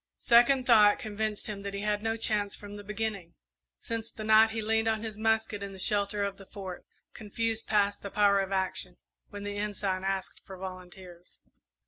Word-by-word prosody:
Second 245 +2 +4
thought 210 -4 +6
convinced 215 -3 -3
him 205 -2 -5
that 200 0 -5
he 200 - -4
had 210 - -3
had 205 0 -1
no 225 +1 -1
chance 210 -2 +1
from 205 0 -10
the 205 - -9
beginning 210 -4 -4 0.4
since 225 -1 -4
the 215 - -8
night 220 +1 +6
he 220 0 -4
leaned 225 +1 +1
on 220 0 0
his 220 -2 -5
musket 220 -2 0
in 200 -1 -6
the - - -10
shelter 200 +1 +2
of 200 -1 -3
the 195 - -13
Fort; 190 -3 -8 0.3
confused 225 +1 -3
past 205 -1 +1
the 200 - -6
power 200 -1 +3
of 195 0 -2
action, 190 -1 -2 0.3
when 205 -1 -8
the 205 0 -4
Ensign 200 -2 -2
asked 195 0 -3
for 190 - -10
volunteers. 185 -1 -10
205 Hz, 195 wpm, -29 LUFS, 195-220 Hz, 0.4 s, thought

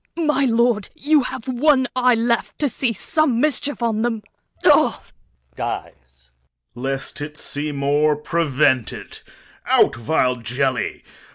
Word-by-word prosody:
My 300 -4 +1
lord, 235 -3 +1
you 295 +1 +3
have 260 -2 -6
one 260 +1 +2
eye 250 -1 +4
left 235 0 -1
To 295 - +1
see 255 -1 -1
some 270 - 0
mischief 290 -2 -1
on 220 -1 0
him. 225 -3 -2 0.4
O! - - +6 0.2
He - - -25 0.4
dies. 65 0 -7 0.4
Corn. 125 +2 -7
Lest 135 +2 -3
it 150 +1 -6
see 150 0 -1
more, 145 +2 +1
prevent 150 -6 +1
it. - - -10 0.5
Out, - - +4
vile 125 +1 0
jelly! 125 +3 -2
215 Hz, 140 wpm, -21 LUFS, -, 0.5 s, O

